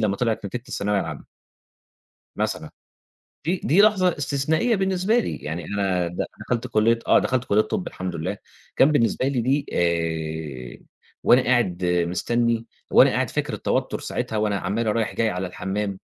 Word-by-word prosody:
لمّا 100 -3 +1
طِلعِت 115 -3 -1
نتيجة 120 +4 -5
الثانوية 100 0 0
العامة. 75 -5 -6 1.1
مثلًا. - - -2 0.8
دي 175 +3 0
دي 185 +7 +5
لحظة 190 -6 +3
استثنائية 155 - +1
بالنسبة 190 +3 +1
لي، - - -2
يعني 80 +3 -5
أنا 95 -3 0
د 85 +1 -3
دخَلت 125 0 -2
كُلية 115 +1 +2
آه - - +6
دخَلت 125 -1 0
كُلية 105 +1 +3
طَب 185 - -3
الحمد 95 0 -5
لله، 80 - -3 0.4
كان 145 +3 +5
بالنسبة 130 -1 +2
لي 130 -4 0
دي 140 +4 +1
آآ 80 -6 -2 0.4
وأنا 125 +1 +6
قاعد 95 -8 +1
مستني، 110 +7 0 0.3
وأنا - - +7
قاعد - - 0
فاكر - - -2
التوتر - - -1
ساعتها 110 - -3
وأنا 105 -1 +1
عمّال 105 +4 -1
رايح 115 -2 -1
جاي 115 -1 +2
على 90 0 -3
الحمّام، 95 +2 -3
110 Hz, 155 wpm, -23 LUFS, 90-130 Hz, 1.1 s, وأنا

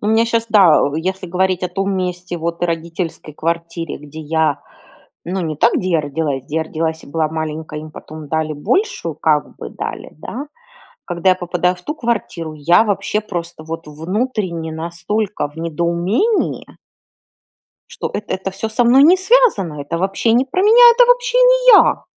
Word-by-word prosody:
У 205 - -4
меня 220 +1 +3
щас 230 0 0
да, 190 -8 +6
если 185 +3 -3
говорить 185 +1 0
о 180 - -1
том 195 +1 -2
месте, 180 -1 -3
вот 170 +1 -4
и - - +3
родительской 165 -1 -4
квартире, 170 0 -3
где 150 +2 -10
я, 155 -1 0 0.6
ну, 185 +2 -3
не 155 -3 -3
там, 235 +9 +3
где 185 0 -2
я 165 - +3
родилась, 145 -2 -3
где 150 +3 -5
я 160 - +2
родилась 160 0 -3
и - - -16
была 155 +1 -1
маленькая, 155 -1 -5
и - - -9
им 155 - -10
потом 155 -1 -10
дали 155 0 -1
большую, 170 - -1
как 150 -1 0
бы - - -8
дали, - - -6
да? 265 - -6 0.6
Когда 175 +1 +1
я - - +4
попадаю 180 0 -1
в 180 - -17
ту 300 - -4
квартиру, 210 - -3
я 165 +6 +4
вообще 205 0 -1
просто, 175 -6 -6
вот, 165 0 -7
внутренне 170 - -3
настолько 170 +4 -3
в 145 - -21
недоумении 170 - -1 1.2
что - - -5
эт 210 - -3
это 190 +1 -3
всё 220 +4 -4
со 235 +2 +1
мной 260 +4 +6
не 345 +5 +7
связано, 375 - +2
это 165 +4 -4
вообще 195 +5 0
не 245 +3 +3
про 365 +8 -1
меня, 475 +3 +8
это - - +5
вообще - - +2
не - - +4
я! - - +4
175 Hz, 180 wpm, -18 LUFS, 160-215 Hz, 1.2 s, меня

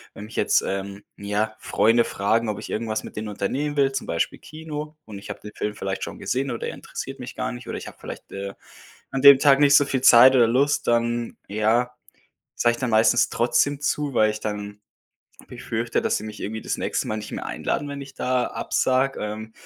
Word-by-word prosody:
Wenn 105 - -8
mich 110 - -12
jetzt, - - +3
ähm, 100 +1 -4
ja, 105 +2 -2
Freunde 115 +2 +3
fragen, 110 +3 0
ob 105 - -3
ich - - -8
irgendwas 110 -1 -2
mit - - -10
denen 110 0 -4
unternehmen 135 +9 -2
will, 135 -1 +3
zum 135 -1 -4
Beispiel 85 - -1
Kino. 155 -1 -8
Und 105 -2 -9
ich 100 - -12
habe - - -6
den 105 - -9
Film 105 0 -3
vielleicht 95 -2 -4
schon - - -6
gesehen 135 +2 -2
oder 120 - -4
er - - -4
interessiert 135 0 -7
mich 125 - -8
gar - - -2
nicht, 120 -1 -9
oder - - -4
ich - - -8
habe - - -11
vielleicht, - - -9
äh, 100 0 -6 0.6
an 135 - -2
dem 140 -1 +10
Tag 140 0 +5
nicht 145 -1 +6
so 145 - +6
viel 135 -2 -1
Zeit 130 +1 +8
oder 120 -3 +5
Lust, 135 +5 +1
dann, 120 0 0
ja, 110 +4 +1 0.6
sage 120 - +2
ich 120 - -6
dann 125 -2 -2
meistens 110 +1 +4
trotzdem 140 +4 +1
zu, 145 -1 -1
weil 110 -2 +4
ich 105 0 -5
dann 105 -1 -5 0.7
befürchte, 115 +1 -2
dass - - +1
sie - - -9
mich 105 -1 -8
irgendwie 110 +2 -4
das - - -3
nächste - - -2
Mal 110 - -2
nicht 105 - -7
mehr - - -5
einladen, 145 - -2
wenn 140 0 -6
ich 135 -1 -12
da 125 -1 0
absage, 130 +1 0
ähm, 110 +1 -5
115 Hz, 220 wpm, -24 LUFS, 105-135 Hz, 0.7 s, dem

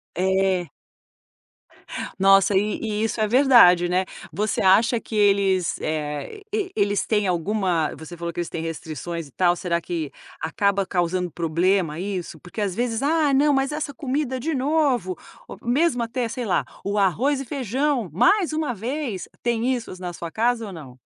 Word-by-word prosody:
É. 190 -1 +1 1.5
Nossa, 195 +1 +5
eh - - +6 0.2
eh, - - -2
isso 220 +1 -1
é 215 - +3
verdade, 225 -8 +6
né. 180 +1 +1 0.3
Você 210 +1 -1
acha 225 +5 +4
que 225 - -9
eles, 195 -3 +2
eh, 155 - -4
e 415 -3 -1
eles 205 -1 +1
têm 210 -2 +1
alguma, 180 -2 0
você 160 +2 -10
falou 170 0 -4
que 175 - -4
eles 170 - -3
têm 160 - -5
restrições 165 0 -5
e - - -20
tal, 175 +5 +2
será 170 -1 -1
que 165 -4 -4 0.3
acaba 200 +4 +1
causando 180 -1 -1
problema, 170 0 0
isso. 185 -3 -4
Porque 175 +5 -8
às 200 -3 -1
vezes, 235 +2 -1
ah, 300 0 +2
não. 290 +2 +4
Mas 270 +1 +1
essa 300 -1 -3
comida 265 -1 -2
de 315 +6 -2
novo, 265 - +1 0.3
o - - -8
mesmo 255 0 +2
até 235 +1 -2
sei 245 +2 -4
lá, 195 - +1 0.2
o 200 +1 -1
arroz 245 - +2
e - - -4
feijão, 260 -2 -1
mais 355 - +3
uma 310 -5 -1
vez, 235 - -4
tem 240 +2 +1
isso 240 -2 -5
na 180 -1 -4
sua 170 0 -7
casa 230 +3 0
ou 200 - -8
não? 135 -7 -11
200 Hz, 170 wpm, -23 LUFS, 175-255 Hz, 1.5 s, eh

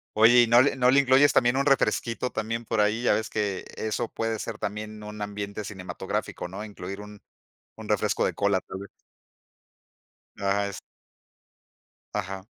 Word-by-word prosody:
Oye, 115 +3 +7
¿y 120 - +4
no 120 +2 +7
le 145 - +2
no 125 -1 +4
le 140 - +6
incluyes 140 +1 +5
también 120 0 +3
un 140 +1 +1
refresquito 125 -2 +1
también 115 +2 -3
por 110 -1 +1
ahí? 105 +3 +1
Ya - - +4
ves 110 - -1
que 100 -3 -1 0.2
e - - -3
eso 115 +2 -2
puede 115 -1 -2
ser - - -5
también 105 0 -5
un 105 0 -8
ambiente 105 0 -4
cinematográfico, 90 -2 -5
¿no? 100 +4 -6
Incluir 100 -2 -7
un 105 0 -11 0.5
un - - -10
refresco - - +1
de - - 0
cola, 100 -1 +1
tal 95 - -8
vez. 100 - -9 1.5
Ajá, 100 0 0
es 100 -2 -7 1.3
Ajá. 95 -2 -4
105 Hz, 170 wpm, -26 LUFS, 100-120 Hz, 1.5 s, Oye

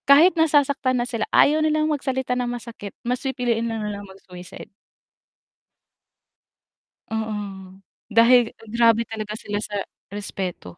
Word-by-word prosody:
Kahit 315 +7 +8
nasasaktan 285 -5 +2
na 240 - 0
sila, 230 -3 -3
ayaw 305 +2 +4
nilang 310 0 +2
magsalita 265 -4 -1
ng 250 -1 -1
masakit, 235 -4 -7
mas 250 +1 -1
pipiliin 245 -4 -1
lang 225 -2 -3
nila 205 -1 -4
mag-suicide. 190 -2 -12 2.4
Oo. 220 -1 -2 0.8
Dahil 230 +1 +5 0.2
grabe 230 0 +3
talaga 215 -1 -5
sila 205 0 -4
sa 205 -1 -3 0.3
respeto. 190 - -6
235 Hz, 115 wpm, -23 LUFS, 210-265 Hz, 2.4 s, Kahit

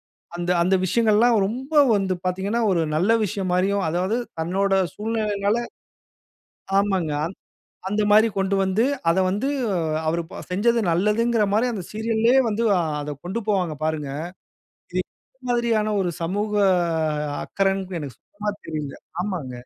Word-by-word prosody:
வ - - - 0.2
அந்த, 175 +1 -1
அந்த 185 +2 +3
விஷயங்கள் 220 +2 +2
எல்லாம் 235 +1 +5
ரொம்ப 260 +7 -6 0.2
வந்து 195 -2 0
பார்த்தீங்கன்னா, 195 +6 -1
ஒரு 170 -2 +2
நல்ல 185 +8 +2
விஷயம் 190 -1 -3
மாரியும் 195 +1 +1
அதாவது 180 +6 0 0.2
தன்னோட 195 +4 0 0.2
சூழ்நிலையினால 210 -1 0 1.2
ஆமாங்க. 190 -6 0
அந் 180 +4 -6 0.5
அந்தமாரி 210 +2 +4
கொண்டு 195 0 +1
வந்து 190 +5 +2 0.3
அத 180 - +2
வந்து 205 +9 -1 0.3
அ - - 0 0.3
அவரு 170 +1 0 0.3
செஞ்சது 230 +6 +2
நல்லதுங்கிறமாரி 210 +4 +2
அந்த 195 -5 -4
சீரியல்லே 225 +2 +1
வந்து 220 +2 -1
ஆ - - +3 0.2
அத 145 0 -4
கொண்டு 195 +6 -2
போவாங்க 180 -6 +1
பாருங்க! 155 -3 -1 0.8
இது 185 - +1 0.4
இந்த - - -63
மாதிரியான 230 -3 +1
ஒரு 180 - -1
சமூக 205 +5 -1 0.9
அக்கறன்டு 195 -2 -1
எனக்கு 140 -5 -7
சுத்தமா 210 +1 -5
தெரியல. 150 -3 -5 0.3
ஆமாங்க. 180 -10 -4
200 Hz, 135 wpm, -23 LUFS, 180-220 Hz, 1.2 s, எல்லாம்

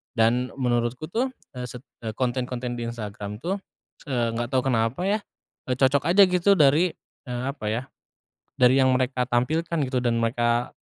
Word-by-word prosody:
Dan 120 +3 +2
menurutku 125 +2 -1
tuh, 255 +3 0 0.3
eee, 125 - -3
se 125 - -8 0.3
eh, 110 - -3
konten-konten 125 -1 -2
di 120 - -3
Instagram 105 -2 -6
tuh, 190 +3 -1 0.5
eee, 120 -4 0
nggak 120 - -1
tahu 130 - +3
kenapa 115 +6 0
ya, 205 +3 +1 0.5
eee, 125 - 0
cocok 135 +2 +3
aja 200 +1 +8
gitu 180 +2 +4
dari, 155 +3 +4 0.4
eee, 125 0 -3
apa 140 -6 -9
ya, 115 +3 0 0.8
dari 125 +2 +5
yang 130 - +4
mereka 125 -1 0
tampilkan 160 +8 0
gitu 130 -1 -1
dan 120 -1 +1
mereka 120 +1 +1
125 Hz, 165 wpm, -25 LUFS, 120-140 Hz, 0.8 s, aja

